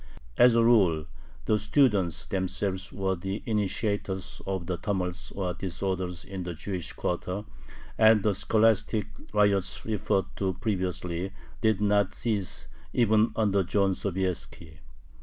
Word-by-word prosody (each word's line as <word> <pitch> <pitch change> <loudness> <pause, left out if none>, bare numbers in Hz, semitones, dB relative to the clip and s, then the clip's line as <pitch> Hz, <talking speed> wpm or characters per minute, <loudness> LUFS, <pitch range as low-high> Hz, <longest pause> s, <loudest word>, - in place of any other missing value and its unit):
As 120 -1 +6
a 115 - +5
rule, 95 -10 +4 0.4
the 110 -1 +2
students 105 - +2
themselves 95 -1 -2
were 95 -1 -1
the 95 +4 -4
initiators 100 -3 -2
of 95 -3 -2
the 90 0 -2
"tumults" 90 -3 -3
or 90 -3 -2
disorders 90 -1 -3
in 95 -1 -6
the 90 -1 -5
Jewish 90 +1 -4
quarter, 90 +3 -3 0.5
and 110 -2 +6
the 105 - +3
scholastic 110 0 +2 0.3
riots 100 -3 +2
referred 105 -3 0
to 95 -2 -1
previously 90 -2 -2 0.3
did 110 -3 +2
not 105 -1 +2
cease 105 -5 -2 0.3
even 110 -1 +3
under 100 -3 +2
John 95 +1 +2
Sobieski. 90 -4 -3
95 Hz, 125 wpm, -28 LUFS, 90-105 Hz, 0.5 s, As